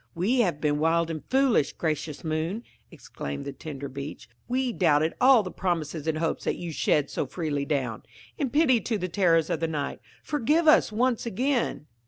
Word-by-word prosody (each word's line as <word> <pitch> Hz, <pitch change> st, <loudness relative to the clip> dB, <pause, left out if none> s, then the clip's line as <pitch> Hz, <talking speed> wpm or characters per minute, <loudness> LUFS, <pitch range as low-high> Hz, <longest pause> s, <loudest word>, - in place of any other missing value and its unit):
"We 215 Hz, +10 st, +1 dB
have 180 Hz, -10 st, +1 dB
been 150 Hz, -1 st, +1 dB
wild 165 Hz, +1 st, +2 dB
and 155 Hz, -2 st, -5 dB
foolish, 260 Hz, -, +3 dB
gracious 155 Hz, -2 st, -3 dB
moon!" 160 Hz, +7 st, -2 dB, 0.3 s
exclaimed 70 Hz, -, -7 dB
the 140 Hz, -, -5 dB
tender 140 Hz, -1 st, -7 dB
Beech. 140 Hz, -2 st, -7 dB, 0.2 s
"We 255 Hz, 0 st, 0 dB
doubted 160 Hz, -4 st, +2 dB
all 255 Hz, -3 st, +7 dB
the 185 Hz, -, -6 dB
promises 165 Hz, -4 st, -2 dB
and 160 Hz, -1 st, 0 dB
hopes 165 Hz, 0 st, -1 dB
that -, -, 0 dB
you 175 Hz, -2 st, -6 dB
shed 150 Hz, -1 st, +1 dB
so -, -, -2 dB
freely 150 Hz, -5 st, -2 dB
down. 130 Hz, -7 st, -2 dB, 0.3 s
In 275 Hz, -, -1 dB
pity 270 Hz, -4 st, +3 dB
to 220 Hz, +2 st, -1 dB
the 180 Hz, -2 st, -3 dB
terrors 165 Hz, -3 st, +2 dB
of -, -, 0 dB
the 165 Hz, -, 0 dB
night, 150 Hz, -3 st, -3 dB, 0.2 s
forgive 300 Hz, +3 st, +1 dB
us 310 Hz, -6 st, +6 dB
once 240 Hz, +2 st, 0 dB
again!" 245 Hz, -, -1 dB
165 Hz, 185 wpm, -26 LUFS, 150-235 Hz, 0.3 s, all